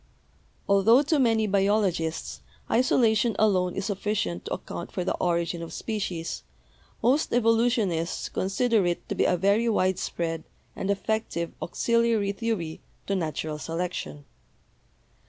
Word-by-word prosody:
Altho 220 Hz, +7 st, +5 dB
to 305 Hz, +1 st, +1 dB
many 225 Hz, -4 st, +3 dB
biologists 195 Hz, -5 st, 0 dB, 0.3 s
isolation 230 Hz, -2 st, +3 dB
alone 185 Hz, -4 st, +2 dB
is 195 Hz, -, -2 dB
sufficient 200 Hz, -, -2 dB
to -, -, -3 dB
account 85 Hz, -, -7 dB
for 180 Hz, -, -2 dB
the 185 Hz, -, 0 dB
origin 170 Hz, -1 st, 0 dB
of 165 Hz, -, -7 dB
species, 190 Hz, -7 st, -3 dB, 0.6 s
most 265 Hz, +7 st, +2 dB
evolutionists 230 Hz, -7 st, +1 dB
con 190 Hz, -, -2 dB
sider 225 Hz, +1 st, +2 dB
it 175 Hz, -, -2 dB
to -, -, 0 dB
be -, -, +1 dB
a 180 Hz, -, +3 dB
very 200 Hz, +6 st, +2 dB
widespread 170 Hz, -5 st, -1 dB, 0.3 s
and 195 Hz, -, -3 dB
effective 200 Hz, -4 st, -1 dB
auxiliary 230 Hz, 0 st, +1 dB
theory 195 Hz, -7 st, -3 dB, 0.2 s
to 195 Hz, -, -1 dB
natural 155 Hz, -3 st, -3 dB
selection. 165 Hz, -, -4 dB
195 Hz, 125 wpm, -26 LUFS, 170-225 Hz, 0.6 s, Altho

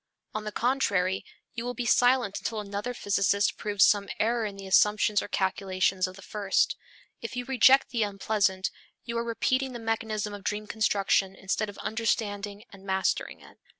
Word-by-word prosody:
On 215 Hz, 0 st, -4 dB
the 215 Hz, -, -3 dB
contrary, 200 Hz, -7 st, +1 dB, 0.3 s
you 230 Hz, -2 st, -4 dB
will 245 Hz, 0 st, -4 dB
be 245 Hz, -, -3 dB
silent 245 Hz, -4 st, +3 dB
until 225 Hz, -2 st, -3 dB
another 205 Hz, +4 st, -4 dB
physicist 200 Hz, -1 st, +1 dB
proves 205 Hz, -2 st, +3 dB
some 205 Hz, -1 st, +2 dB
error 230 Hz, +1 st, +1 dB
in 205 Hz, -2 st, -5 dB
the 195 Hz, 0 st, -9 dB
assumptions 210 Hz, +2 st, +3 dB
or -, -, -6 dB
calculations 190 Hz, -1 st, 0 dB
of 185 Hz, -, -10 dB
the 195 Hz, -, -13 dB
first. 200 Hz, -1 st, 0 dB, 0.5 s
If -, -, -6 dB
you 245 Hz, 0 st, -3 dB
reject 265 Hz, +1 st, +5 dB
the 235 Hz, -, -1 dB
unpleasant, 195 Hz, -2 st, 0 dB, 0.3 s
you 235 Hz, -, -5 dB
are -, -, -1 dB
repeating 255 Hz, +3 st, 0 dB
the 240 Hz, -, -6 dB
mechanism 220 Hz, -2 st, -2 dB
of 205 Hz, -1 st, -8 dB
dream 210 Hz, +1 st, -2 dB
construction 200 Hz, -3 st, +1 dB
instead 200 Hz, +2 st, -2 dB
of 205 Hz, -, -10 dB
understanding 210 Hz, -2 st, -2 dB
and 195 Hz, -1 st, -13 dB
mastering 190 Hz, -1 st, -1 dB
it. -, -, -17 dB
210 Hz, 175 wpm, -28 LUFS, 195-230 Hz, 0.5 s, reject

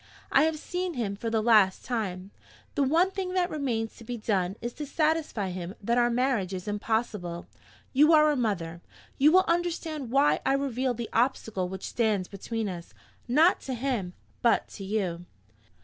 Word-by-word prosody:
I -, -, +5 dB
have 320 Hz, -1 st, 0 dB
seen 360 Hz, +2 st, -3 dB
him 210 Hz, -5 st, -2 dB
for 225 Hz, +3 st, -4 dB
the 220 Hz, -1 st, 0 dB
last 215 Hz, -5 st, +4 dB
time. 195 Hz, -5 st, -3 dB, 0.4 s
The -, -, 0 dB
one 330 Hz, +8 st, +3 dB
thing 375 Hz, -1 st, -4 dB
that 360 Hz, 0 st, +1 dB
remains 235 Hz, -7 st, -2 dB
to -, -, -12 dB
be 245 Hz, +1 st, -5 dB
done 195 Hz, -4 st, 0 dB
is 240 Hz, 0 st, -5 dB
to 300 Hz, -, -6 dB
satisfy 305 Hz, -, 0 dB
him 180 Hz, +2 st, -6 dB
that 235 Hz, +4 st, +1 dB
our 240 Hz, 0 st, +3 dB
marriage 235 Hz, -6 st, 0 dB
is 185 Hz, +2 st, -7 dB
impossible. 205 Hz, -4 st, -2 dB, 0.5 s
You 300 Hz, +4 st, +6 dB
are 305 Hz, -1 st, +6 dB
a -, -, 0 dB
mother; 175 Hz, -9 st, -2 dB, 0.4 s
you 295 Hz, +3 st, +6 dB
will 370 Hz, +2 st, +5 dB
understand 330 Hz, -5 st, -1 dB
why 275 Hz, +4 st, +3 dB
I 265 Hz, -, +2 dB
reveal 265 Hz, -2 st, 0 dB
the 235 Hz, 0 st, -6 dB
obstacle 220 Hz, -6 st, 0 dB
which 190 Hz, 0 st, -7 dB
stands 215 Hz, -6 st, 0 dB
between 220 Hz, +2 st, -4 dB
us 175 Hz, -3 st, -7 dB, 0.3 s
not 310 Hz, +9 st, +4 dB
to 260 Hz, -, -4 dB
him, 235 Hz, -8 st, -2 dB, 0.3 s
but 235 Hz, -, +3 dB
to 200 Hz, -, -9 dB
you.' 190 Hz, -4 st, -2 dB
235 Hz, 180 wpm, -28 LUFS, 200-285 Hz, 0.5 s, You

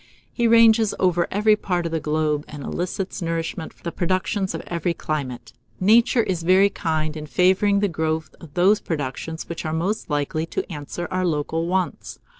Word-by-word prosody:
He 235 Hz, -1 st, +2 dB
ranges 225 Hz, -1 st, +5 dB
over 175 Hz, -2 st, +2 dB
every 210 Hz, +2 st, +3 dB
part 180 Hz, -4 st, -2 dB
of 165 Hz, -, -2 dB
the 165 Hz, -, 0 dB
globe, 150 Hz, -1 st, 0 dB
and 145 Hz, -2 st, -8 dB
elicits 185 Hz, +5 st, -3 dB
nourishment 165 Hz, 0 st, -3 dB
from -, -, -27 dB
the 170 Hz, -, -3 dB
productions 185 Hz, +3 st, -1 dB
of -, -, -5 dB
every 170 Hz, 0 st, -2 dB
climate. 140 Hz, -7 st, -4 dB, 0.3 s
Nature 230 Hz, +4 st, +4 dB
is 180 Hz, -4 st, -2 dB
very 190 Hz, +4 st, +4 dB
kind 155 Hz, -4 st, -2 dB
in 155 Hz, -1 st, -6 dB
favouring 190 Hz, +4 st, +3 dB
the 205 Hz, -, +3 dB
growth 160 Hz, -2 st, -2 dB
of 155 Hz, -4 st, -13 dB
those 195 Hz, +4 st, +4 dB
productions 160 Hz, +1 st, -4 dB
which 170 Hz, -, -5 dB
are 155 Hz, -1 st, -2 dB
most 180 Hz, +6 st, -2 dB
likely 150 Hz, +2 st, -1 dB
to -, -, -3 dB
answer 155 Hz, +3 st, -5 dB
our 185 Hz, 0 st, 0 dB
local 165 Hz, 0 st, -1 dB
wants. 185 Hz, +1 st, -2 dB
170 Hz, 180 wpm, -23 LUFS, 155-190 Hz, 0.3 s, ranges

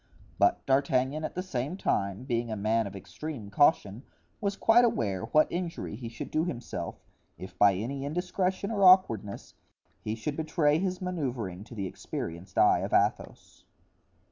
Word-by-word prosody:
But 355 Hz, -, +3 dB
D'Artagnan 135 Hz, +2 st, +1 dB
at -, -, -4 dB
the 180 Hz, -, -2 dB
same 145 Hz, 0 st, -3 dB
time, 100 Hz, -, -1 dB
being 120 Hz, -2 st, -2 dB
a -, -, -2 dB
man 110 Hz, +1 st, +1 dB
of 100 Hz, -, -9 dB
extreme 115 Hz, -, -7 dB
caution, 110 Hz, -, +3 dB, 0.4 s
was 200 Hz, -2 st, -1 dB
quite 230 Hz, +2 st, +5 dB
aware 100 Hz, -, 0 dB
what 155 Hz, -, +3 dB
injury 170 Hz, -, -4 dB
he 115 Hz, +1 st, -7 dB
should 115 Hz, -, -8 dB
do 155 Hz, -, +1 dB
himself, 145 Hz, -9 st, -5 dB, 0.4 s
if 95 Hz, 0 st, -10 dB
by 100 Hz, -2 st, +6 dB
any 135 Hz, +8 st, -4 dB
indiscretion 180 Hz, +6 st, -2 dB
or 200 Hz, -3 st, 0 dB
awkwardness 150 Hz, -, +4 dB, 0.5 s
he 110 Hz, -, -3 dB
should 140 Hz, +6 st, -4 dB
betray 155 Hz, -1 st, +2 dB
has 185 Hz, 0 st, -2 dB
manoeuvering 125 Hz, -, -3 dB
to 120 Hz, -, -12 dB
the 100 Hz, -3 st, -3 dB
experienced 85 Hz, -1 st, -6 dB
eye -, -, +5 dB
of -, -, -4 dB
Athos. -, -, -1 dB
135 Hz, 160 wpm, -29 LUFS, 105-180 Hz, 0.5 s, by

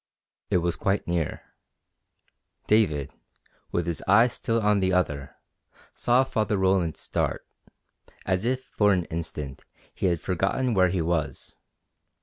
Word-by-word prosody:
It -, -, +3 dB
was 85 Hz, -1 st, 0 dB
quite 100 Hz, +1 st, 0 dB
near. 85 Hz, -3 st, -2 dB, 1.2 s
David, 80 Hz, -11 st, +2 dB, 0.6 s
with 85 Hz, -, 0 dB
his 85 Hz, -2 st, -3 dB
eyes 115 Hz, +5 st, +5 dB
still 115 Hz, 0 st, -1 dB
on 105 Hz, -1 st, +3 dB
the 95 Hz, -1 st, +1 dB
other, 75 Hz, -7 st, -1 dB, 0.6 s
saw 125 Hz, +2 st, +3 dB
Father 110 Hz, -5 st, 0 dB
Roland 95 Hz, -4 st, +1 dB
start, -, -, -2 dB, 0.8 s
as 95 Hz, +1 st, 0 dB
if 130 Hz, +2 st, -1 dB
for 105 Hz, -1 st, +4 dB
an 90 Hz, -2 st, 0 dB
instant 80 Hz, -4 st, -5 dB, 0.3 s
he -, -, -1 dB
had 85 Hz, -2 st, +1 dB
forgotten 100 Hz, -, 0 dB
where 95 Hz, -3 st, +4 dB
he 90 Hz, -2 st, 0 dB
was. 75 Hz, -5 st, -3 dB
95 Hz, 135 wpm, -26 LUFS, 85-105 Hz, 1.2 s, eyes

